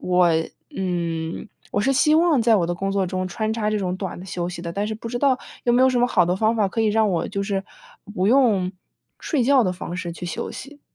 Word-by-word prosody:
我 180 -1 +3 0.5
嗯， 170 -1 -3 0.2
我 205 - 0
是 270 +6 +2
希 305 +3 +4
望 325 -6 +3
在 225 -1 +5
我 175 - +1
的 175 - -1
工 195 +2 -2
作 195 -2 0
中 185 0 -3
穿 215 +4 -2
插 220 -2 -1
这 215 - 0
种 185 -2 -2
短 190 -2 -5
的 180 - -9
休 175 -1 -3
息 175 -1 -6
的， 170 - -5
但 200 +3 -2
是 220 - -3
不 230 - -7
知 240 +1 -3
道 270 -3 +3 0.3
有 240 - +3
没 245 +2 +4
有 260 - +6
什 250 - +1
么 245 - +4
好 185 -7 +3
的 175 +1 0
方 220 +3 +1
法 210 - +2
可 225 +4 -2
以 220 - +2
让 215 0 +3
我 170 -3 -1
就 200 - -2
是， 195 -1 -1 0.5
不 185 -1 0
用 215 -7 +3 0.5
睡 280 -7 0
觉 270 0 +5
的 185 - 0
方 180 -1 -6
式 175 -1 -4
去 175 +1 -7
休 170 - -4
息？ 290 +1 -10
200 Hz, 280 characters per minute, -23 LUFS, 180-235 Hz, 0.5 s, 有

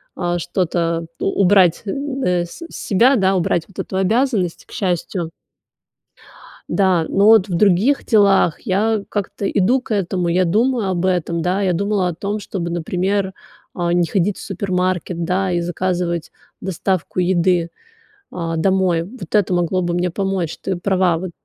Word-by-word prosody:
а, 175 -1 -1
что-то 170 -1 -1
у 195 - 0
убрать 185 -3 +4
н 275 +5 -3
э, 180 -1 +1
с 170 - -12
себя, 240 +7 +3
да, 195 -4 +2
убрать 175 -2 +1
вот 195 - -14
эту - - -4
обязанность, 205 -2 0
к - - -21
счастью. 175 -2 -2 1.4
Да, 185 -4 +2
но 200 +1 +2
вот 220 -3 +6
в 185 - -5
других 205 +9 +3
делах 200 -6 +3
я 215 0 0
как-то 200 -1 -3
иду 235 +7 +2
к 235 - -4
этому. 180 -3 -1
Я 180 +2 +2
думаю 225 +3 +1
об 180 -1 -1
этом, 175 -2 0
да. 185 +3 0
Я 185 -2 +1
думала 200 +1 0
о 170 - -5
том, 205 +4 -3
чтобы, 175 -4 -4
например, 190 +3 -1 0.4
а, 175 -1 0
не 175 -1 +2
ходить 195 +1 0
в - - -9
супермаркет, 185 -3 -2
да, 185 +2 0
и 175 - +1
заказывать 175 -1 -2 0.3
доставку 185 0 -2
еды, 175 -1 +2 0.6
а, 165 -2 -3
домой. 185 -1 +2
Вот 190 0 -10
это 205 -3 +3
могло 180 +1 +1
бы 175 0 -1
мне 175 +1 0
помочь. 190 -2 -2
Ты 190 - -2
права, 185 -2 +1
вот. 185 +1 -5
185 Hz, 160 wpm, -19 LUFS, 175-200 Hz, 1.4 s, вот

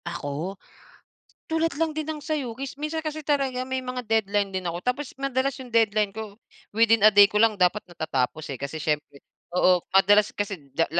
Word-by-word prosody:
Ako? 170 +3 -4 0.9
Tulad 325 0 0
lang 325 -1 +2
din 310 - -2
ng 310 -1 -4
sa'yo 290 -6 -3
mis 275 0 -6
minsan 305 +2 -3
kasi 310 0 -4
talaga 270 -4 0
may 260 0 -2
mga 250 0 -4
deadline 205 -2 +1
din 185 -1 -3
ako 170 +1 -4
tapos 255 +3 -2
madalas 275 0 0
yung 255 -1 -9
deadline 215 -3 +2
ko, 215 -1 -8 0.4
within 225 0 +4
a 215 - +10
day 205 0 +9
ko 205 - -12
lang 225 -2 +3
dapat 180 +4 +3
natatapos 155 -3 -2
eh, - - -6
kasi 140 +3 -4
siyempre 150 -2 -3 0.3
oo 180 0 +4
madalas 205 +2 +5
kasi 205 -1 -3 0.2
da 165 - +2
215 Hz, 185 wpm, -25 LUFS, 185-265 Hz, 0.9 s, a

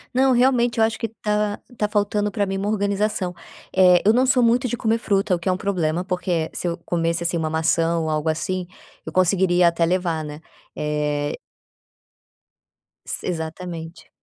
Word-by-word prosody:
Não, 265 +1 +4
realmente 245 -1 +3
eu - - +5
acho 220 0 -3
que 230 - -1
tá 210 -1 -1 0.2
tá 210 -2 0
faltando 205 0 0
para 205 -1 0
mim 195 0 -3
uma 200 +2 -2
organização, 200 -2 0 0.4
eh, 180 -1 +6
eu 215 - +6
não 255 +2 +3
sou 255 -1 +4
muito 240 +2 +3
de 240 - -3
comer 225 -1 +1
fruta, 200 -3 +1
o 175 - +1
que 170 - -2
é - - +4
um 180 - 0
problema, 180 -3 -1
porque 180 -3 -1
se - - -3
eu 170 - -2
comesse, 170 0 0
assim, 170 +1 0
uma 160 -2 -1
maçã 165 +1 +1
ou 160 -1 -1
algo 155 +1 0
assim, 180 +3 -2 0.4
eu - - -7
conseguiria 180 -1 +3
até 170 0 +1
levar, 170 -2 0
né. 150 0 -7 0.4
Eh 150 -1 -1 1.7
Si - - -5
exatamente. 165 0 -6
185 Hz, 180 wpm, -22 LUFS, 165-210 Hz, 1.7 s, eh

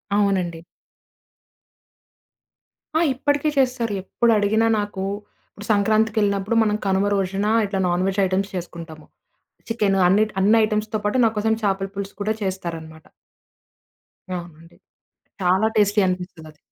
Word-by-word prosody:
అవునండి. 190 -5 0 2.4
ఆ! 320 - +4
ఇప్పటికే 285 +3 0
చేస్తారు. 250 -5 +1
ఎప్పుడు 235 +4 +1
అడిగినా 220 +2 +2
నాకు, 205 -2 -4 0.5
ఇప్పుడు 205 - -11
సంక్రాంతికెళ్ళినప్పుడు 210 0 +1
మనం 210 -1 +1
కనుమ 190 +1 +2
రోజున 195 +1 -1 0.2
ఇట్లా 195 -1 -3
నాన్ 175 +1 0
వెజ్ 195 +1 -1
ఐటెమ్స్ 190 +2 -1
చేసుకుంటాము. 165 -3 -8 0.6
చికెన్ 210 -4 +1
అన్ని, 200 +4 +4 0.2
అన్ని 215 +4 +5
ఐటెమ్స్‌తో 215 0 -2
పాటు 210 +5 +1
నాకోసం 220 0 +1
చేపల 195 -1 0
పులుసు 200 0 -5
కూడా 215 +2 0
చేస్తారన్నమాట. 165 -4 -6 1.3
అవునండి. 170 -1 -10 0.6
చాలా 185 +4 +3
టేస్టీ 205 0 +3
అనిపిస్తదది. 180 -4 -6
200 Hz, 110 wpm, -22 LUFS, 185-215 Hz, 2.4 s, అన్ని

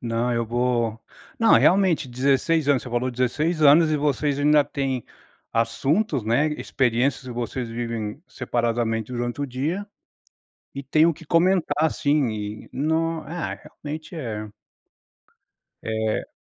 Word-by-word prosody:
Não, 120 +1 -1
eu 115 -1 -1
vou 120 -1 0 0.4
não, 225 -1 +4
realmente, 180 -7 +3
16 140 +5 +1
anos, 140 -4 +3
você - - -8
falou 120 +1 -1
16 150 +7 0
anos 155 +2 +6
e 150 - +1
vocês 145 0 0
ainda 150 0 +4
têm 135 -4 -3 0.5
assuntos, 120 - 0
né, 120 +7 +2
experiências 130 +1 0
e - - -6
vocês 120 +1 -4
vivem 115 +2 -4
separadamente 115 -2 -2
durante 120 +3 -3
o - - -1
dia, 150 +10 -3 0.9
e 140 - -5
tem 155 +3 +3
o 170 - +3
que 165 +2 -14
comentar, 170 -1 +2
assim, 150 -4 +2
e 105 0 -6
não, 160 +3 0
ah, 170 +1 -4
realmente 155 +3 -9
é 110 -7 -5 1.3
É 110 -1 -1
135 Hz, 135 wpm, -24 LUFS, 120-155 Hz, 1.3 s, anos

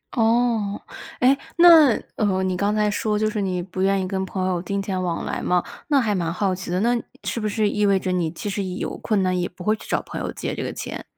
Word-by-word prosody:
哦， 225 -3 +2 0.4
诶， 260 +2 +6 0.2
那 330 -7 +8 0.2
哦， 190 -3 +1
你 185 -1 0
刚 205 +3 0
才 210 0 +2
说 210 0 0
就 215 +1 +1
是 210 - -2
你 185 -2 -1
不 185 +1 -5
愿 195 0 +2
意 185 - -2
跟 190 0 -2
朋 185 0 -3
友 180 -2 -1
金 200 +3 -3
钱 190 -1 -2
往 175 -2 -2
来 - - -3
嘛。 180 -1 +1 0.2
那 285 -3 +4
还 220 -4 +1
蛮 170 -4 -1
好 190 +1 0
奇 185 -1 -6
的， 180 +1 0
那 240 +2 +3 0.3
是 - - -2
不 215 -1 -1
是 215 0 +1
意 210 0 0
味 195 -1 +3
着 185 - -2
你 175 -3 0
其 175 - -7
实 200 0 -2
有 185 0 -4
困 210 -4 0
难， 185 -1 +1
也 175 - -1
不 180 0 -11
会 215 +3 +2
去 - - -13
找 - - 0
朋 - - -6
友 - - -3
借 - - -4
这 - - -4
个 - - -3
钱？ - - -6
195 Hz, 280 characters per minute, -23 LUFS, 185-215 Hz, 0.4 s, 那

